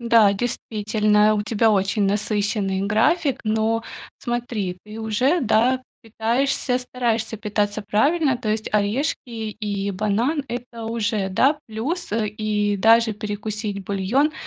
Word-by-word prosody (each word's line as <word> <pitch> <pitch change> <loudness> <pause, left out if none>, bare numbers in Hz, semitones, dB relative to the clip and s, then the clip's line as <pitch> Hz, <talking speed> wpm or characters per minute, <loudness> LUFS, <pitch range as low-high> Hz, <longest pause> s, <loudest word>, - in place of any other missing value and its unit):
Да, 230 -3 +5
действительно, 215 -1 +1
у 210 - 0
тебя 225 +1 +2
очень 200 +1 +1
насыщенный 205 -1 0
график, 245 - +2
но 220 +1 +1 0.4
смотри, 235 -7 -3
ты 215 +1 -10
уже, 255 +9 +1
да, 245 +4 +2 0.2
питаешься, 245 +3 0
стараешься 235 -3 -2
питаться 210 0 -1
правильно. 265 +7 +2
То 230 -4 -4
есть 215 0 -2
орешки 210 +8 +1
и 215 -3 -3
банан- 215 - 0
это 240 -1 -6
уже, 225 -3 -1
да, 270 +10 +3
плюс, 265 +12 -3
э, 220 -1 +1
и 210 -1 -1
даже 225 +2 +5
перекусить 210 -1 -4
бульон- 205 +11 +1
220 Hz, 125 wpm, -22 LUFS, 205-240 Hz, 0.4 s, Да